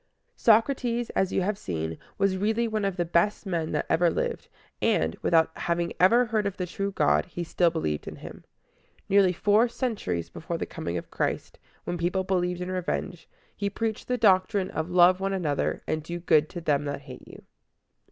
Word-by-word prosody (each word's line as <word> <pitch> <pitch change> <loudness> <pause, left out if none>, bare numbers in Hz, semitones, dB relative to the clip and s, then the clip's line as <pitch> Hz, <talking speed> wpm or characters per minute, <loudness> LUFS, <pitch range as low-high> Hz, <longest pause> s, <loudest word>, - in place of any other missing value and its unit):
Socrates, 235 +1 +2
as 190 -1 0
you 190 - +1
have 205 +2 -1
seen, 80 -2 -4 0.2
was 195 -1 +2
really 220 +4 0
one 215 -2 -1
of 195 -1 -2
the 175 - 0
best 170 +6 +1
men 170 -4 -2
that - - 0
ever 170 +1 +3
lived, - - -3 0.3
and, 80 +1 +1
without 160 -1 +3
having 170 0 -1
ever 230 +8 +5
heard 215 -3 0
of 200 - -5
the 180 - -2
true 195 +3 -3
God, 75 - +2
he 175 - -5
still 170 +1 +2
believed 115 - -3
in - - -6
him. - - -11 0.7
Nearly 195 -2 +5
four 210 +6 +3
centuries 205 - -3
before - - -5
the - - -3
coming 85 +1 -4
of - - -7
Christ, - - -3 0.2
when 175 - -4
people 180 +3 0
believed 180 -1 -1
in 180 +1 -3
revenge, 180 -1 -3 0.3
he 200 0 -2
preached 220 +1 -3
the 250 - 0
doctrine 195 -2 +3
of 160 +2 -3
"Love 180 +1 +5
one 195 0 -1
another" 155 -7 -1
and 155 0 -1
"Do 170 +3 -6
good 155 -3 +3
to 175 - -7
them 145 -3 +1
that 140 -1 -4
hate 130 -3 -12
you." - - -13
180 Hz, 190 wpm, -27 LUFS, 165-200 Hz, 0.7 s, ever